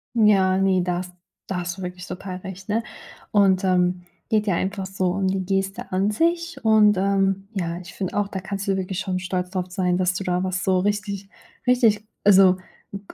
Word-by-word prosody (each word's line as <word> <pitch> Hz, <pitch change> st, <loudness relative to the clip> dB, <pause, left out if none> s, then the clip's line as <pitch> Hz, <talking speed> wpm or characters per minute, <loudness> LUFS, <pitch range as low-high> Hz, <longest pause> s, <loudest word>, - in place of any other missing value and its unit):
Ja, 195 Hz, -4 st, +4 dB
ne, 190 Hz, -1 st, +3 dB
da 175 Hz, -1 st, -1 dB
has 180 Hz, 0 st, -7 dB, 0.4 s
da 185 Hz, -, -3 dB
hast 175 Hz, +1 st, -4 dB
du 190 Hz, -, -8 dB
wirklich 180 Hz, 0 st, -6 dB
total 185 Hz, 0 st, -6 dB
recht, 190 Hz, +1 st, -9 dB
ne? 225 Hz, +2 st, +1 dB, 0.5 s
Und, 195 Hz, -2 st, +4 dB
ähm, 180 Hz, -1 st, +2 dB, 0.3 s
geht 215 Hz, -2 st, +1 dB
ja 180 Hz, -, +2 dB
einfach 195 Hz, +1 st, -2 dB
so 190 Hz, -1 st, -2 dB
um 195 Hz, +1 st, 0 dB
die 190 Hz, 0 st, 0 dB
Geste 195 Hz, +4 st, -2 dB
an 195 Hz, +3 st, +1 dB
sich, 335 Hz, +4 st, 0 dB
und, 215 Hz, -2 st, +5 dB
ähm, 195 Hz, 0 st, +1 dB
ja, 170 Hz, -4 st, -2 dB
ich 180 Hz, -1 st, -11 dB
find 190 Hz, -2 st, -4 dB
auch, 205 Hz, -1 st, 0 dB
da 190 Hz, -, -4 dB
kannst 195 Hz, +1 st, -5 dB
du 195 Hz, -, +2 dB
wirklich 190 Hz, -1 st, -3 dB
schon 185 Hz, -2 st, -2 dB
stolz 185 Hz, -1 st, -3 dB
drauf 185 Hz, -2 st, -2 dB
sein, 180 Hz, -1 st, 0 dB
dass 185 Hz, 0 st, +1 dB
du 195 Hz, -, -3 dB
da 180 Hz, 0 st, 0 dB
was 185 Hz, 0 st, -2 dB
so 185 Hz, -1 st, +2 dB
richtig 200 Hz, 0 st, -2 dB, 0.4 s
richtig, 225 Hz, -4 st, +3 dB, 0.2 s
also 190 Hz, -2 st, +6 dB, 0.4 s
G 200 Hz, -, -4 dB
190 Hz, 205 wpm, -23 LUFS, 185-200 Hz, 0.5 s, also